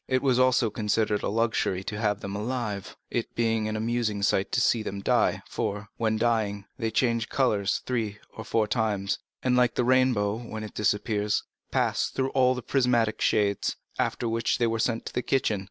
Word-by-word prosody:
It 130 0 +1
was 130 -2 +3
also 125 -3 +3
considered 105 -1 0
a - - -1
luxury 110 -4 0
to 105 +1 -5
have 105 -1 0
them 100 0 -5
alive, 110 -2 -3
it - - -3
being 115 -2 +1
an 110 - -2
amusing 110 -2 -1
sight 95 0 +1
to - - +3
see 120 -1 +3
them 100 -2 -5
die, - - +2
for, 105 +1 -3
when 110 -1 +1
dying, 110 -3 0
they 115 -3 -2
change 115 0 +1
color 110 -7 +1
three 110 -1 -1 0.2
or 110 - -6
four 110 -1 +1
times, 105 -4 0 0.2
and 125 -1 +2
like 125 -2 +3
the - - +2
rainbow 125 -5 +3
when 110 -2 -6
it 105 - -8
disappears, 105 0 0 0.3
pass - - +1
through 135 0 -1
all 130 -1 +3
the 125 - -6
prismatic 120 -4 +1
shades, 100 -1 +1 0.2
after 120 - 0
which 115 +1 0
they 120 - +2
were 115 0 0
sent 115 0 0
to - - -6
the - - 0
kitchen. 125 -6 +1
110 Hz, 190 wpm, -27 LUFS, 105-120 Hz, 0.3 s, was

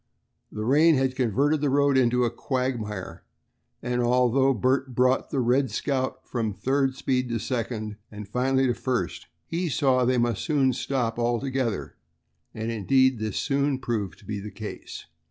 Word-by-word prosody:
The 110 0 -4
rain 155 +6 +5
had 130 -1 +1
converted 140 +5 +1
the 145 - +1
road 140 0 +3
into 125 -1 +3
a 120 - +1
quagmire, 120 -9 -3 0.6
and 125 0 0
although 125 +2 +3
Bert 130 +2 0
brought 130 +1 +2
the 135 - -1
"Red 130 +2 +2
Scout" 130 +4 -2
from 110 -5 -2
third 135 +1 0
speed 130 -2 -1
to 115 - -1
second, 110 -3 -3
and 105 -1 -8
finally 130 +4 +1
to 125 - +2
first, 120 -7 -3 0.2
he 170 +1 -2
saw 135 -2 +2
that 125 0 +3
they 130 - +1
must 120 -3 0
soon 140 -5 +2
stop 120 -2 -2
altogether, 120 -1 -1 0.5
and 110 +1 -4
indeed 130 +3 +2
this 110 -2 -3
soon 140 -1 +1
proved 110 -7 -3
to - - -19
be 105 0 -4
the 105 +1 -7
case. 110 0 -8
125 Hz, 165 wpm, -26 LUFS, 115-135 Hz, 0.6 s, rain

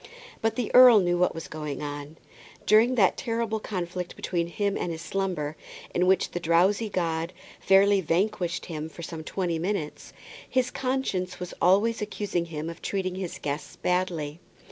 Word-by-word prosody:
But 225 0 +1
the 240 -3 -3
earl 250 -3 +9
knew 175 -2 +1
what 180 - +2
was 165 - -6
going 150 -2 -5
on. 145 +1 -6 0.5
During 225 +5 +5
that 195 -6 +4
terrible 230 -2 -1
conflict 180 -3 -4
between 170 -2 -2
him 200 +3 -1
and 175 - -2
his 165 0 -6
slumber, 180 -7 -2 0.4
in 180 +1 +2
which 190 0 +3
the 175 - -3
drowsy 180 +6 +2
god 170 -2 -1 0.3
fairly 195 +1 +5
vanquished 175 +1 0
him 155 -2 -5
for 170 - -10
some 160 -1 -6
twenty 170 -1 -2
minutes, 170 -4 -3 0.4
his 255 -1 +1
conscience 195 -9 -2
was 180 0 -6
always 210 +6 +3
accusing 205 -4 -2
him 160 -1 -5
of 170 0 -7
treating 190 -2 -2
his 185 -2 -5
guests 145 +1 -4
badly. 175 -4 -1
180 Hz, 165 wpm, -27 LUFS, 165-205 Hz, 0.5 s, earl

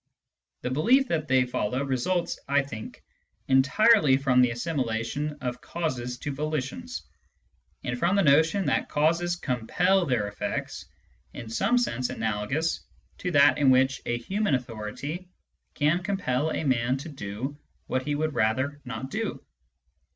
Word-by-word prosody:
The 125 - -3
belief 250 - +4
that 155 -2 -1
they 130 -1 +4
follow 125 +1 -1
results, 140 +7 -1
I 140 0 +3
think, 110 -6 -9 0.4
entirely 140 - +5
from 130 -2 +3
the 125 - +4
assimilation 125 +1 -2
of 125 -1 -4
causes 125 -7 -3
to 145 - -4
volitions, 155 - -4 0.8
and - - -3
from 180 -1 +2
the 200 - +3
notion 160 +6 +4
that - - 0
causes 170 +4 +1
compel 175 +7 +1
their 120 -6 +1
effects 100 - -4 0.5
in 115 - -7
some 195 - +2
sense 130 - 0
analogous 110 +10 -1 0.4
to 180 - -2
that 145 -1 +6
in 140 -2 +5
which 130 +1 +3
a 120 - 0
human 190 - 0
authority 125 +9 -5 0.5
can 155 +4 +2
compel 160 -7 -1
a 160 - -2
man 130 -2 +1
to 140 +5 -7
do 130 +1 -5 0.3
what 130 - -1
he 145 +2 -2
would 155 +1 -1
rather 130 +7 0
not 125 +1 -6
do. 225 0 -3
140 Hz, 145 wpm, -27 LUFS, 125-165 Hz, 0.8 s, that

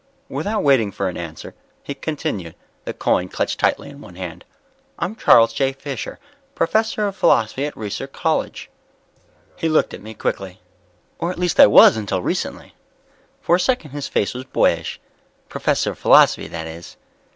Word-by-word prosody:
Without 210 0 -2
waiting 130 -8 +3
for 95 0 -2
an 90 - -7
answer, 80 -2 -8 0.3
he 140 - -5
continued, 140 - -4 0.3
the - - -3
coin 90 0 0
clutched - - -2
tightly - - +1
in 140 0 -12
one 90 - -13
hand. 90 -2 -7 0.5
"I'm 185 +6 -3
Charles 115 - +5
J. 135 +1 0
Fisher, 135 0 -6 0.4
professor 220 -1 +1
of 200 -1 -3
Philosophy 115 - +2
at 150 - -8
Reiser 105 -2 -5
College." - - -2 0.8
He 165 - -1
looked 155 - +2
at - - -8
me 110 +2 -10
quickly. 95 -3 -4 0.6
"Or 170 - -1
at 180 - -5
least 180 -1 -1
I - - +10
was 105 - +7
until 100 -4 -2
recently." - - -3 0.7
For 170 - +3
a - - -6
second 185 - 0
his 145 0 -5
face 100 - -1
was 125 +1 -6
boyish. 130 - 0 0.5
"Professor - - 0
of - - -12
Philosophy, - - +5
that 80 -1 -6
is." 80 +1 -10
130 Hz, 165 wpm, -20 LUFS, 95-160 Hz, 0.8 s, I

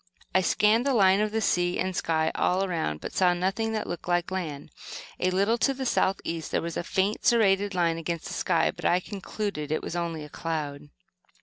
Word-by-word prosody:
I 185 - +4
scanned 215 +7 +3
the 275 - +2
line 195 -1 +5
of 215 +1 0
sea 175 -1 +1
and 185 0 -1
sky 160 -1 +1
all 185 +2 +1
around, 160 - -2
but - - -6
saw 180 -2 +3
nothing 195 +5 -1
that 215 - -2
looked 175 - -6
like 175 0 0
land. 155 -6 -4 0.5
A 185 - +2
little 200 +6 +1
to 275 +2 +2
the 265 0 -4
south 195 -5 +1
east 165 -1 -4
there - - 0
was 170 -1 -4
a - - -1
faint, 195 +4 0
serrated 205 -4 +3
line 165 -2 +1
against 165 0 -4
the - - -5
sky, - - +1
but - - -12
I 175 - +3
concluded 195 -4 -5
that 155 - +1
it - - -4
was - - -5
only 170 -3 -3
a - - -8
cloud. 150 -3 -4
185 Hz, 215 wpm, -27 LUFS, 165-205 Hz, 0.5 s, line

